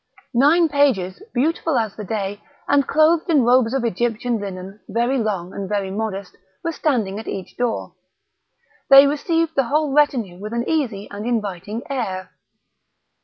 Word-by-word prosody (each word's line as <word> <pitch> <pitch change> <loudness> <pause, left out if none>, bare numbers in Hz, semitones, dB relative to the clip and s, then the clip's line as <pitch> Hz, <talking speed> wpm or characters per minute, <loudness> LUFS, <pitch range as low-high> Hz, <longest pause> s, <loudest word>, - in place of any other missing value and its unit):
Nine 300 +7 +5
pages, 275 - +1
beautiful 310 +2 0
as 220 -3 -1
the 215 - -6
day, 205 0 -3 0.3
and 280 -1 +3
clothed 315 +2 +3
in 295 -6 +4
robes 245 -1 +4
of 265 -2 -1
Egyptian 235 +2 -1
linen, 195 0 -7
very 240 +4 +1
long 195 -5 -2
and 195 -1 -5
very 200 -2 -1
modest, 200 -2 -4 0.3
were 335 - -1
standing 230 -11 -1
at 220 - -9
each 190 -2 -6
door. 245 -2 -2 1.0
They 275 +1 +10
received 325 +3 0
the 270 -4 +2
whole 295 +2 0
retinue 245 -11 +1
with 210 +3 -6
an 235 0 -2
easy 240 -11 -1
and 205 +1 -6
inviting 210 -1 -3
air. 185 -9 -3
235 Hz, 155 wpm, -21 LUFS, 200-280 Hz, 1.0 s, They